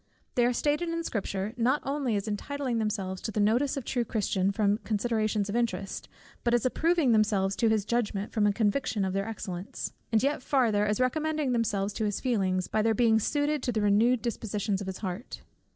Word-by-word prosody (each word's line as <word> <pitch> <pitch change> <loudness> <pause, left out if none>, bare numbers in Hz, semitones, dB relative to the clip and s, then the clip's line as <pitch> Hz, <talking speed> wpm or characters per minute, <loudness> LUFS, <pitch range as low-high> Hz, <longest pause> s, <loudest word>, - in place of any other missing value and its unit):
They 240 -1 +3
are - - +2
stated 295 +6 0
in 335 0 -2
Scripture, 200 -5 -3
not 255 +5 +2
only 275 -5 -1
as 200 +1 -2
entitling 250 +3 -2
themselves 200 -4 -2
to 220 - -3
the 215 - -2
notice 240 +8 +2
of 275 - -3
the - - -20
true 245 -2 +1
Christian 200 -4 0
from 205 0 +1
considerations 215 -1 0
of 205 - -3
interest, 230 -5 -2 0.3
but 240 0 +3
as 240 - 0
approving 320 +1 +2
themselves 205 -3 +2
to 230 - +3
his 215 -2 +1
judgment 210 -3 -1
from 210 -2 +3
a - - +4
conviction 210 0 0
of 190 - -2
their 195 +2 -1
excellence, 190 -4 -5 0.2
and 225 0 +3
yet 285 0 +1
farther, 230 -7 +2
as 210 0 0
recommending 305 +2 0
themselves 210 -4 0
to 220 - -2
his 205 -1 -1
feelings, 190 -7 0
by 215 - 0
their 225 0 +2
being 225 -1 +4
suited 290 +5 0
to 250 - -1
the 220 - -1
renewed 225 +4 +3
dispositions 210 -3 -2
of 195 - -5
his 190 - -4
heart. 185 +7 -6
220 Hz, 205 wpm, -28 LUFS, 205-250 Hz, 0.3 s, a